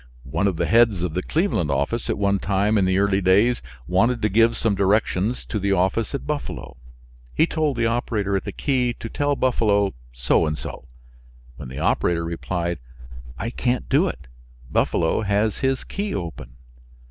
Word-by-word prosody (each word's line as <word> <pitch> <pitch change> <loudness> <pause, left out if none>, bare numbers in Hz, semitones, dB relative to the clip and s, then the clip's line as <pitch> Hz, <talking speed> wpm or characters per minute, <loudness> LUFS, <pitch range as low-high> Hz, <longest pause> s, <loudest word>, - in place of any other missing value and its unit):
One 80 +9 0
of 95 - 0
the - - 0
heads 115 -6 +4
of 90 -3 -2
the 90 - -1
Cleveland 155 - 0
office 70 - -1
at - - 0
one 100 -1 +1
time 100 +3 +1
in 95 - +2
the 95 0 +2
early 100 0 +2
days 100 +7 +3 0.2
wanted 115 - +2
to 105 - +3
give 115 +3 +3
some 115 -2 +1
directions 100 +2 +1
to 105 - -3
the 100 0 +1
office 95 +7 0
at 140 - -5
Buffalo. 145 - -5 0.6
He 160 - +4
told 155 -5 -1
the 115 - +1
operator 110 -4 0
at 95 - -1
the - - -5
key 125 -4 0
to 115 - -7
tell 145 +3 0
Buffalo 105 -7 +2 0.2
so 65 +6 +1
and 75 0 -2
so, 70 - -8 0.7
when - - -8
the 65 - -8
operator 85 +3 +1
replied: 85 0 -3 0.6
"I 115 - -3
can't 125 0 -1
do 150 +8 +3
it; 70 - -6 0.5
Buffalo 80 +5 +1
has 105 +1 0
his 135 0 0
key 200 0 -4
open." 75 -8 -6
100 Hz, 180 wpm, -23 LUFS, 90-120 Hz, 0.7 s, heads